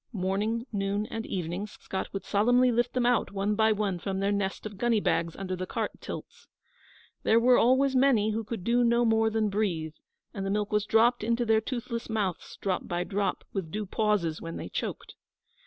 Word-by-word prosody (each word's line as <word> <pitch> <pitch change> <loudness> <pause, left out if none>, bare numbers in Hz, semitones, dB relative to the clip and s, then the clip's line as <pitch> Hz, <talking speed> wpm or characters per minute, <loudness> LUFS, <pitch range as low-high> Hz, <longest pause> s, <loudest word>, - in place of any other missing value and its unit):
Morning, 210 +4 -1
noon 200 +1 -1
and 225 0 -4
evening 180 +2 -3
Scott 190 -2 -6
would 195 -1 -5
solemnly 245 +5 +3
lift 240 +1 +1
them 250 -1 +1
out 245 -1 +2
one 200 +1 0
by 220 +1 +3
one 200 -4 -1
from 190 +2 -3
their 200 +1 +1
nest 200 0 -2
of 205 -2 -7
gunny 240 -2 +2
bags 165 -4 0
under 185 -1 -4
the 185 0 -5
cart - - -2
tilts. - - -8 0.7
There 225 - +4
were 245 +1 +5
always 260 +3 +3
many 250 -5 +4
who 225 +1 -2
could 215 -3 -5
do 240 +4 +3
no 235 0 +3
more 225 0 +3
than 220 -1 +1
breathe, 175 -7 -1 0.4
and 195 - -4
the 195 - -2
milk 205 +1 -1
was 210 0 +1
dropped 235 +1 +4
into 235 +2 +1
their 220 -1 +3
toothless 235 -1 -4
mouths 205 -6 -2
drop 190 -2 -2
by 175 0 -1
drop, 200 -1 -2
with 190 -5 -3
due 210 +5 -3
pauses 195 -6 0
when 165 0 -6
they - - -6
choked. - - -5
210 Hz, 200 wpm, -28 LUFS, 195-230 Hz, 0.7 s, were